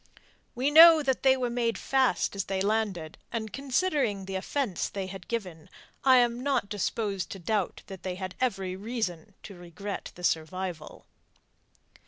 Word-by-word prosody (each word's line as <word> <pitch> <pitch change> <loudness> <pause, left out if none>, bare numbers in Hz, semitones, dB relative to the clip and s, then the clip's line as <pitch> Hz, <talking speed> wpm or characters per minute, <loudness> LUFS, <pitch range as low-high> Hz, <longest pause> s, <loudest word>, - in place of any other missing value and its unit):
We 260 +4 +1
know 325 0 +9
that 265 -2 0
they 265 -1 +5
were 250 -2 -1
made 235 -1 0
fast 265 -5 +1
as 195 - -2
they 195 -1 -2
landed, 195 -6 -1
and 220 -2 -4
considering 275 - 0
the 195 - -6
offence 190 - -2
they 195 -1 -4
had 190 -1 -9
given 180 -9 -5 0.3
I 260 -1 +7
am 240 0 +2
not 270 -7 0
disposed 205 -2 -2
to - - -8
doubt 195 +1 -2
that 190 -2 -10
they 185 -1 -4
had 185 0 -5
every 195 -7 -1
reason 200 -3 -4
to 200 - -9
regret 180 +3 -7
the 180 - -12
survival. 165 0 -3
205 Hz, 160 wpm, -28 LUFS, 185-250 Hz, 0.3 s, know